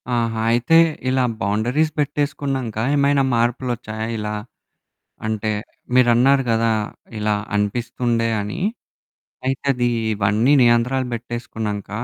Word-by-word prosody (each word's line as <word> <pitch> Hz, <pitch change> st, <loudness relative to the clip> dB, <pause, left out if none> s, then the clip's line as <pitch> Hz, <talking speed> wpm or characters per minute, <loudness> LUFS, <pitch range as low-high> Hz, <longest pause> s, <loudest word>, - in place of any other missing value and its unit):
ఆహా! 115 Hz, -1 st, 0 dB
అయితే 120 Hz, +8 st, +4 dB, 0.3 s
ఇలా 130 Hz, 0 st, +2 dB, 0.2 s
బౌండరీస్ 120 Hz, +10 st, +1 dB
పెట్టేసుకున్నాంక 140 Hz, -5 st, -2 dB, 0.2 s
ఏమైనా 140 Hz, -1 st, +3 dB
మార్పులొచ్చాయా 120 Hz, -2 st, -1 dB
ఇలా? 105 Hz, 0 st, -3 dB, 0.9 s
అంటే, 110 Hz, 0 st, -1 dB, 0.4 s
మీరన్నారు 125 Hz, +2 st, +5 dB
కదా! 115 Hz, 0 st, +2 dB, 0.5 s
ఇలా 105 Hz, 0 st, +1 dB, 0.2 s
అనిపిస్తుండే 115 Hz, +2 st, 0 dB
అని. 105 Hz, -, -5 dB, 0.9 s
అయితే 135 Hz, +1 st, -2 dB
అది 120 Hz, -1 st, 0 dB, 0.3 s
ఇవన్నీ 105 Hz, +6 st, +2 dB
నియంత్రాలు 120 Hz, +2 st, +3 dB
పెట్టేసుకున్నాంక 115 Hz, -3 st, -5 dB
120 Hz, 95 wpm, -21 LUFS, 110-130 Hz, 0.9 s, మీరన్నారు